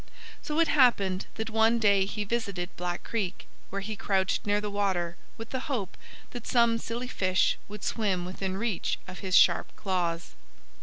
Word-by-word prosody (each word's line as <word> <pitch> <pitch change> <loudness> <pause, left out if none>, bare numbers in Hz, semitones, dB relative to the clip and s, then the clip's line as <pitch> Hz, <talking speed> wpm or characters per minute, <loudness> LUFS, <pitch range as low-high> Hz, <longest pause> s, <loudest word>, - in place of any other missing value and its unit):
So 305 +1 -2
it 330 - +5
happened 200 -9 +3
that 220 0 -4
one 225 +1 +4
day 200 -3 +4
he 210 +1 -3
visited 200 -5 -3
Black 175 0 -3
Creek, 200 -6 -3 0.2
where 200 +1 -3
he 215 +1 -4
crouched 195 0 0
near 205 0 +3
the 210 0 -4
water 185 -4 0 0.2
with 225 0 -8
the 260 - -1
hope 210 -9 -2 0.4
that 245 -2 -7
some 235 -2 +4
silly 235 +2 -4
fish 185 -6 +1
would 210 -1 -9
swim 195 -6 0
within 190 +1 -3
reach 215 -3 -1
of 185 - -8
his 185 -2 0
sharp 170 - +5
claws. 175 -4 -2
200 Hz, 170 wpm, -28 LUFS, 185-225 Hz, 0.4 s, it